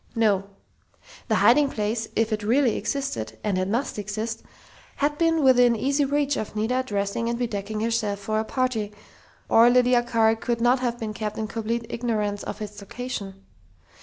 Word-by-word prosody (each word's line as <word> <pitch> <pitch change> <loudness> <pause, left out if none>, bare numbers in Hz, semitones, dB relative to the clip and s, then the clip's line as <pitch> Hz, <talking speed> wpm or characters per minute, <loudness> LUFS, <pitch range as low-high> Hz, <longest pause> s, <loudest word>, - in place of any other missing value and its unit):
No. 205 -4 +2 0.8
The - - +2
hiding 280 +4 +5
place, 220 0 -2
if 225 0 +1
it 215 - -2
really 240 +3 +2
existed 110 - -3
and 205 -3 0
it 185 - -1
must 235 +2 -2
exist 215 +3 -4 0.5
had 290 +1 0
been 330 -2 +2
within 245 -2 +5
easy 280 +5 +1
reach 285 0 0
of 215 - -5
Nita 230 +4 0
dressing 205 0 -2
and 235 - -1
bedecking 215 -3 -3
herself 225 -3 0
for 215 +2 -2
a - - 0
party, 225 -3 -1 0.6
or 230 +1 +6
Lydia 250 0 +4
Carr 225 -2 +2
could 235 +1 -2
not 245 +2 +3
have 240 -2 -1
been 220 -2 -4
kept 215 0 -4
in 220 - -2
complete 230 +1 -3
ignorance 210 -4 -2
of 215 - -5
its 210 0 -8
location. 200 -3 -6
230 Hz, 170 wpm, -25 LUFS, 210-250 Hz, 0.8 s, or